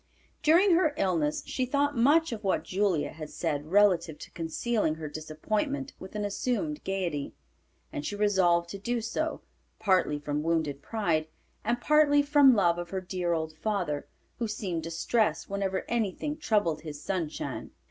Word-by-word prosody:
During 350 +6 +5
her 335 -4 +3
illness 165 -6 +1
she 260 - -2
thought 285 +3 +1
much 295 +7 +4
of 220 -2 -5
what 195 - +1
Julia 190 -5 0
had 155 -1 -8
said 145 0 -2
relative 175 -4 +3
to - - -11
concealing 165 +1 -1
her 160 -1 -6
disappointment 210 - -3
with 190 +2 -10
an 210 -1 -1
assumed 255 +9 -2
gayety, 175 -7 -2 0.6
and 145 - -3
she 205 - -3
resolved 185 -5 +3
to 200 - -6
do 240 +4 -1
so, 235 +8 -2 0.4
partly 185 -8 +2
from 145 0 -2
wounded 155 -3 0
pride, 170 -8 0 0.4
and 240 +1 0
partly 290 +1 +4
from 285 -3 +6
love 175 -4 +3
of 175 0 -5
her 190 - -2
dear 180 -2 -1
old 160 -1 -2
father, 175 -7 -2 0.3
who 235 - 0
seemed 200 -6 -3
distressed 170 +8 0
whenever 195 -1 -1
anything 235 +6 -1
troubled 210 - +1
his 150 -2 -7
"Sunshine." 170 -3 -3
195 Hz, 160 wpm, -29 LUFS, 160-240 Hz, 0.6 s, from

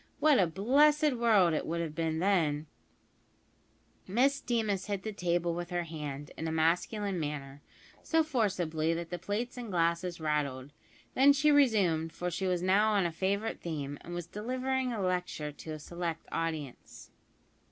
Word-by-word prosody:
What 300 -3 +5
a 185 - +4
blessed 290 - +3
world 215 -8 +4
it 155 - -2
would 170 +1 -2
have 165 -3 -3
been 160 0 -1
then!" 160 -5 +1 1.4
Miss 270 +8 +2
Deemas 215 -7 -1
hit 200 -2 -3
the 220 - -4
table 175 -2 0
with 175 +1 -5
her 175 -1 -1
hand, 150 -3 -6
in 160 - -4
a - - -1
masculine 180 +5 0
manner, 145 -2 -5 0.4
so 325 -1 +2
forcibly, 180 - 0
that 170 0 -5
the 175 - -3
plates 235 +5 -3
and 240 -3 -6
glasses 170 0 0
rattled, 145 -3 -2 0.4
then 275 +2 +6
she 300 +2 +3
resumed, 195 - +3
for 180 +1 -3
she 190 +3 -2
was 180 -1 0
now 205 +4 +3
on 200 -3 +2
a 170 - 0
favourite 200 +6 -2
theme, 145 -4 -4
and 175 - -7
was 175 -1 -4
delivering 255 +6 -2
a 230 - -3
lecture 180 -5 -2
to 155 +2 -8
a - - -5
select 170 +1 -5
audience. 155 -6 -5
175 Hz, 165 wpm, -31 LUFS, 160-220 Hz, 1.4 s, then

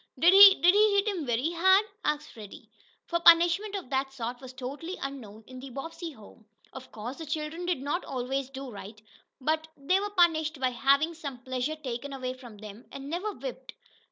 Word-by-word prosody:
"Did 345 +3 +5
he 395 0 +10
did 355 +2 +5
he 420 0 +4
hit 400 +1 +2
him 360 -9 -2
very 245 +7 0
hard?" 380 +4 +4 0.2
asked 300 0 -2
Freddie, 210 -3 -12 0.3
for 340 - -1
punishment 345 +5 +5
of 370 -10 -6
that 270 0 -1
sort 245 -1 -6
was 260 -1 -9
totally 275 +8 -7
unknown 230 -6 -7
in 255 0 -11
the 270 +1 -9
Bobbsey 330 +6 -7
home. 220 -1 -17 0.3
Of 260 0 -11
course 235 +5 -7
the 325 - -6
children 310 +3 -4
did 340 -7 -1
not 295 +6 -2
always 265 +1 -3
do 270 -1 -8
right, 210 0 -10 0.4
but 315 +3 -1
they 325 +7 +1
were 410 +1 -3
punished 325 -5 +2
by 255 -1 +1
having 280 +6 +2
some 280 -6 -8
pleasure 260 +4 -2
taken 275 -2 -6
away 255 -1 -4
from 245 -4 -13
them, 210 +2 -11
and 275 +1 -8
never 370 +6 -2
whipped. - - -8
280 Hz, 195 wpm, -28 LUFS, 255-340 Hz, 0.4 s, he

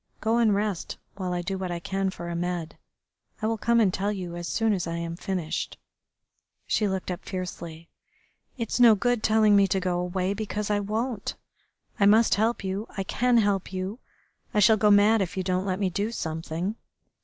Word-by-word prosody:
"Go 225 +1 +1
and 220 -4 +4
rest 205 -3 -2 0.2
while 185 -2 -3
I 175 0 -2
do 190 +1 -3
what 185 -1 -3
I 175 - -2
can 195 +2 -1
for 175 -2 -7
Ahmed. 170 -1 -3 0.6
I 215 - -3
will 225 0 0
come 235 +2 +3
and 200 -5 +3
tell 200 +2 0
you 180 -4 -5
as 175 0 -5
soon 225 +2 +1
as 180 -4 -2
I 165 0 -3
am 170 0 -4
finished." 180 -3 -3 0.9
She 210 - +1
looked 190 -1 -2
up 180 - -5
fiercely. 170 -3 -6 0.7
"It's 230 0 -2
no 235 -3 +8
good 245 +2 0
telling 215 -1 +4
me 200 -1 +5
to 190 +1 +1
go 180 -1 -1
away, 180 +2 -1
because 210 0 -3
I 205 - +2
won't. 215 +2 -3 0.6
I 200 - +5
must 220 +2 +5
help 220 +1 +1
you. 195 +3 -3
I 195 - 0
can 245 +5 +2
help 200 -4 +1
you. 190 +5 -4 0.6
I - - +4
shall 220 +2 +6
go 210 0 +3
mad 205 +2 +5
if 190 0 -3
you 185 - 0
don't 185 +1 -1
let 185 -1 0
me 190 -2 0
do 205 +5 -1
something. 165 +2 -3
195 Hz, 200 wpm, -26 LUFS, 180-215 Hz, 0.9 s, no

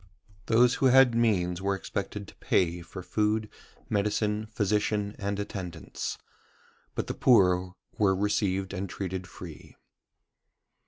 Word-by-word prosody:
Those 120 +2 +5
who 135 - +6
had 130 -1 +6
means 95 -7 +1
were 100 0 +1
expected 100 +1 -5
to - - -14
pay 85 -1 +1
for 90 +2 -9
food, 105 +2 0 0.4
medicine, 105 +1 0
physician, 105 -1 0
and 100 0 -2
attendance: 90 -5 -5 0.8
but - - -1
the - - -3
poor 90 -6 +4 0.2
were 95 -3 +4
received 95 -1 0
and 100 0 -3
treated 95 0 -4
free. 85 -4 -11
100 Hz, 120 wpm, -28 LUFS, 95-105 Hz, 0.8 s, who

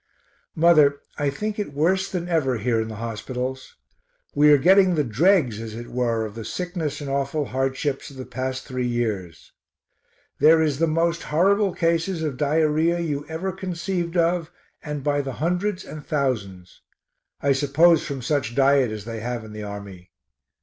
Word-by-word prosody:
Mother, 155 -4 +5 0.2
I 145 -1 +1
think 210 +9 -4
it 170 -9 -4
worse 185 +6 +1
than 175 -2 -3
ever 150 -8 +1
here 115 +1 0
in 110 - -3
the 110 - -7
hospitals. 125 +4 -5 0.6
We 150 +1 +5
are 145 - +7
getting 185 +4 +5
the 150 - +2
dregs 130 - +2
as 110 -1 -7
it 120 +1 -8
were 115 -2 0
of 105 - -7
the 115 +1 -7
sickness 170 - -4
and 145 - -5
awful 140 +2 -1
hardships 135 +2 -2
of 140 - -13
the 130 - -6
past 130 +1 -4
three 130 -2 -2
years. 100 - -3 0.9
There 160 +1 +6
is 150 -3 +1
the 165 - +3
most 165 +2 +1
horrible 195 +5 +2
cases 165 +1 0
of 150 -4 -2
diarrhoea 155 +3 +2
you 145 -3 -3
ever 170 +4 -3
conceived 180 -1 -3
of 170 -1 +1 0.3
and 150 -2 -5
by 145 0 +1
the 135 -2 -5
hundreds 180 - -1
and 155 -1 -9
thousands; 105 - -3 0.6
I 140 - +1
suppose 150 +5 +4
from 135 -3 -5
such 130 -4 -1
diet 135 -2 +4
as 105 -1 -6
they 115 -1 -5
have 120 0 -4
in 105 - -11
the 105 - -7
army. 100 -3 -8
145 Hz, 170 wpm, -23 LUFS, 120-165 Hz, 0.9 s, are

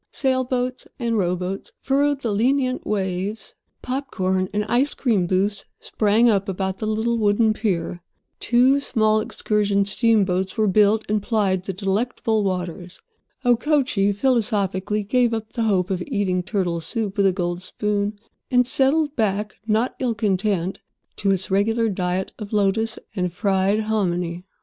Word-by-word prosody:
Sailboats 255 -1 -1
and 235 -2 -1
rowboats 180 0 -2
furrowed 280 +1 +1
the 230 - -1
lenient 255 +4 +1
waves, 195 +1 -3 0.3
popcorn 190 -8 -1
and 210 0 -1
ice 255 +6 +2
cream 210 -9 +1
booths 195 +3 0
sprang 215 +2 +2
up 200 -3 +2
about 190 0 -3
the 215 - -2
little 225 +2 0
wooden 215 +1 +3
pier. 175 -5 -2 0.4
Two 255 +3 +4
small 215 -5 +2
excursion 205 -2 0
steamboats 195 -2 +1
were 215 -1 +2
built, 210 +2 +3
and 210 0 0
plied 195 -4 0
the - - -2
delectable 215 +3 -1
waters. 180 -2 -4 0.5
Okochee 245 -5 +2
philosophically 210 -4 0
gave 240 +2 +2
up 220 -1 -6
the 235 - -2
hope 190 -1 +1
of 185 -1 -1
eating 200 -8 0
turtle 180 -3 -1
soup 205 +4 -2
with 200 -2 +3
a - - +4
gold 175 -1 -3
spoon, 205 +2 -2 0.3
and 250 -1 +4
settled 285 +4 +2
back, 210 -2 0
not 220 +3 +1
ill 245 -3 0
content, 195 -3 0 0.4
to 200 - 0
its 190 -1 0
regular 225 +4 +2
diet 185 -1 -2
of 210 -2 -7
lotus 215 +2 +1 0.2
and 180 -3 -1
fried 195 +1 +1
hominy. 180 -5 -1
210 Hz, 145 wpm, -22 LUFS, 190-230 Hz, 0.5 s, Two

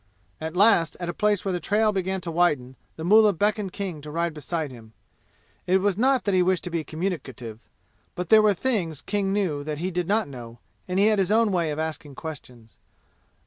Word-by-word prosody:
At 160 +2 -5
last 195 -4 +4
at 175 -1 -4
a - - -2
place 210 +1 +1
where 195 - 0
the 180 - -1
trail 210 +5 +2
began 190 -1 -2
to 170 -1 -4
widen, 150 -7 +1 0.2
the 160 - -7
mullah 210 +3 +6
beckoned 205 +1 0
King 185 -7 -5
to 150 - -9
ride 170 +1 -1
beside 155 0 -4
him. 115 -3 -13 0.7
It 185 +1 +4
was 195 0 +1
not 260 +4 +2
that 200 - 0
he 185 - +4
wished 185 0 +1
to 180 - -5
be 165 -1 -1
communicative, 140 - -5 0.6
but 180 -1 -4
there 220 -1 +8
were 210 -2 +3
things 175 - -1
King 200 -2 -1
knew 180 -8 -1
that 150 0 -4
he 180 +4 -3
did 175 -1 -2
not 215 +2 +1
know, 120 -4 -10 0.3
and 180 0 -2
he 200 - +4
had 215 -1 +3
his 190 0 +1
own 225 -1 +3
way 170 -4 0
of 150 - -3
asking 155 -3 -5
questions. 125 -8 -10
180 Hz, 215 wpm, -25 LUFS, 155-200 Hz, 0.7 s, there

